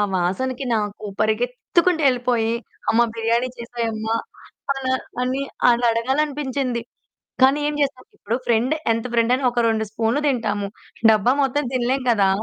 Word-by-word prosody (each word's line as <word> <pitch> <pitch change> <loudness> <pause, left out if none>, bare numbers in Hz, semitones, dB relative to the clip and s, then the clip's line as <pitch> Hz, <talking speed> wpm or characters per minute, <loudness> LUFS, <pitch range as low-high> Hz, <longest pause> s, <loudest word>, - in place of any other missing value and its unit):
వాసనకి 245 +10 -1
నాకు 210 0 -3 0.2
పరిగెత్తుకుంటూ 250 +10 +1
వెళ్ళిపోయి 245 -3 +1 0.4
అమ్మ 230 - +4
బిర్యానీ 230 +2 +1
చేసేయమ్మ. 230 -2 -4 0.7
అలా 260 -1 -1 0.3
అని 260 +2 -1 0.3
అనడగాలనిపించింది. 255 +2 0 0.6
కానీ 270 +2 +6
ఏం 300 - -2
చేస్తాం. 270 -2 -2
ఇప్పుడు 220 +3 -2
ఫ్రెండ్ 240 +6 +2 0.2
ఎంత 230 - -3
ఫ్రెండైనా 240 +3 +2
ఒక 240 - +1
2 220 -1 +1
స్పూన్లు 230 +5 0
తింటాము. 210 -6 -1 0.4
డబ్బా 215 +3 +4
మొత్తం 290 +2 0
తినలేము 255 +1 0
కదా! 200 -4 +3
240 Hz, 120 wpm, -22 LUFS, 225-260 Hz, 0.7 s, కానీ